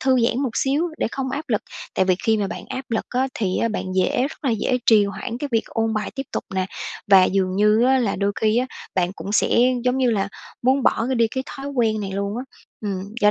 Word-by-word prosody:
thư 260 0 +3
giãn 240 - 0
một 260 - 0
xíu 290 +6 +1
để - - +1
không 265 -1 -3
áp 290 +3 -4
lực. 215 -3 +1 0.3
Tại 190 - +3
vì 185 -1 +3
khi 220 -1 +3
mà 205 -2 0
bạn - - -6
áp 260 0 -4
lực 225 - 0
á 260 +2 0
thì 190 -4 -1
á 230 - +1
bạn 215 - -3
dễ 185 +6 +2
rất 285 - -3
là 265 - +2
dễ 240 +3 +1
trì 215 -3 +6
hoãn 230 +4 -5
cái 290 - -3
việc 225 - +2
ôn 225 -1 -1
bài 215 0 -2
tiếp 270 - -3
tục - - -2
nè, 185 0 0 0.4
và 195 -2 +7
dường 190 -1 0
như 210 +2 +4
á 265 0 +4
là 225 -5 0
đôi 200 +1 0
khi 220 +1 +3
á 255 - +1 0.3
bạn 180 0 +1
cũng 200 - -5
sẽ, - - +3 0.3
giống 250 +1 +2
như 250 -2 +3
là, 200 -2 0 0.3
muốn 260 +2 +3
bỏ 225 - +2
cái 260 - 0
đi 230 -2 +3
cái 260 +3 -3
thói 275 0 -7
quen 225 -6 +1
này 195 -2 -4
luôn 200 +2 -2
á. 255 - -4 0.4
Ừm, 200 0 -4
do 210 0 +6
225 Hz, 260 wpm, -22 LUFS, 200-260 Hz, 0.4 s, và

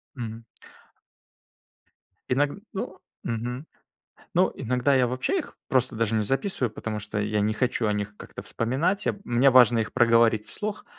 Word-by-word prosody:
Мгм. 115 -2 -6 1.9
Иног 140 +3 +2 0.2
ну, 190 -2 -5 0.3
мгм. 120 +5 -3 0.7
Ну, - - +3
иногда 125 +3 +1
я 130 -2 +4
вообще 130 - -1
их 325 - -7
просто 130 -3 +1
даже 115 -1 0
не 110 - +2
записываю, 135 - -1
потому 110 -1 -4
что 105 +1 -4
я 105 0 0
не 105 +1 +1
хочу 120 -1 0
о 105 - +2
них 105 0 -3
как-то - - -9
вспоминать, 140 - -1
а - - +1
мне 120 +3 +4
важно 125 -2 +6
их 110 -2 -2
проговорить 115 -2 +4
вслух, 210 -1 -5
120 Hz, 155 wpm, -26 LUFS, 110-130 Hz, 1.9 s, важно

